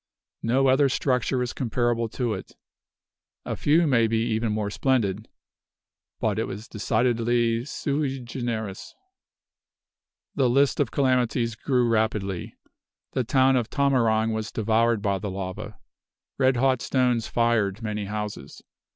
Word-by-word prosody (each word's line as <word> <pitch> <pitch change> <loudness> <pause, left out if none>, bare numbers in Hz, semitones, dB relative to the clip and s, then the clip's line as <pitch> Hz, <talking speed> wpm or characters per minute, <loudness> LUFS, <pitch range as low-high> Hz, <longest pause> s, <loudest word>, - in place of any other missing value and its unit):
No 130 +4 +2
other 135 +1 +4
structure 125 -1 0
is 120 - -4
comparable 120 -2 0
to 120 -1 -2
it. 95 - -8 0.9
A - - -3
few 160 +4 +3
may 120 -6 +3
be 115 0 0
even 110 0 0
more 105 -1 -2
splendid; 110 -5 0 0.9
but - - 0
it - - 0
was 105 +4 -7
decidedly 115 +1 +1
sui 140 -1 -2
generis. 115 -5 -5 1.4
The 130 -3 +2
list 135 +3 +2
of - - +2
calamities 125 -3 +1
grew 125 +2 +1
rapidly. 110 -5 -1 0.6
The 130 - 0
town 130 +2 +3
of 120 -3 0
Tamarang 115 -6 +2
was 110 0 -3
devoured 115 0 +1
by 100 -2 0
the 105 - -4
lava. 95 -1 -6 0.6
Red 130 -2 +3
hot 130 0 +2
stones 125 -3 +1
fired 115 -3 +1
many 105 -1 -3
houses. 105 -8 -6
115 Hz, 130 wpm, -25 LUFS, 110-130 Hz, 1.4 s, other